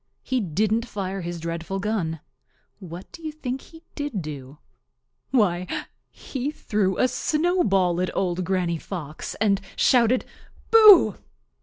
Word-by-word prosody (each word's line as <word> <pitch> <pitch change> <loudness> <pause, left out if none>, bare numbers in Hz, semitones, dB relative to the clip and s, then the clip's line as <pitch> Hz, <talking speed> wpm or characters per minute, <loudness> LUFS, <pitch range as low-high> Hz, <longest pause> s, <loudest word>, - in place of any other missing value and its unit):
He 260 - 0
didn't 215 +6 0
fire 195 -2 -4
his 170 0 -5
dreadful 170 +3 -4
gun. 190 -7 -2 0.6
What 180 -1 -9
do 335 - -12
you 315 -1 -4
think 265 -4 -5
he 325 0 -16
did 290 - -4
do? 140 -2 -8 0.7
Why, 185 -8 +2 0.4
he 270 +1 -5
threw 205 -10 -1
a 255 - +4
snowball 245 - +1
at 185 - 0
Old 185 -1 0
Granny 175 -2 -1
Fox 155 -5 -6
and 200 -2 +1
shouted 245 -1 +3 0.5
"Boo!" 420 - +8
195 Hz, 130 wpm, -24 LUFS, 175-255 Hz, 0.7 s, Boo